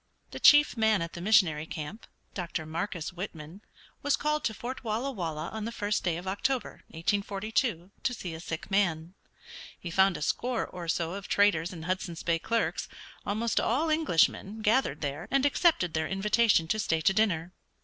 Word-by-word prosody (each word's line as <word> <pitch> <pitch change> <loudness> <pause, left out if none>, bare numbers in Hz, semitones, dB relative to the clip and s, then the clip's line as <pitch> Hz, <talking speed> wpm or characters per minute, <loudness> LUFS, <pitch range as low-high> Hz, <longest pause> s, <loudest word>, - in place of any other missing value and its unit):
The - - -6
chief 295 -2 +7
man 220 -5 +3
at 170 - -7
the 170 - -7
missionary 175 -6 +3
camp, 160 +9 -7 0.3
Dr. 170 -3 -4
Marcus 170 +2 -4
Whitman, 175 -1 -7 0.4
was 285 0 +2
called 300 0 0
to 220 - 0
Fort 255 +5 -6
Walla 230 +5 -1
Walla 165 - -4
on 220 -1 -5
the 230 - -3
first 205 -2 -1
day 170 -3 0
of 180 +2 -8
October, 230 +5 -2
1842, 200 +2 -1
to 250 - 0
see 180 -6 -6
a 160 - -7
sick 165 +3 -6
man. 175 -4 +1 0.7
He 175 - -6
found 190 +1 +4
a - - -4
score 245 +7 0
or 175 -2 -8
so 165 +1 -1
of 200 0 -6
traders 175 -5 +3
and 165 -3 -8
Hudson's 180 -2 -3
Bay 170 -1 +1
clerks, 230 +6 -1 0.4
almost 220 +3 0
all 305 +7 +1
Englishmen, 220 - +1
gathered 230 +6 +2
there, 145 +3 -4
and 275 +1 +2
accepted 285 - +3
their 160 0 0
invitation 205 -2 +3
to 215 - +1
stay 165 -5 0
to 195 +4 +3
dinner. 180 -5 +1
195 Hz, 180 wpm, -29 LUFS, 165-220 Hz, 0.7 s, chief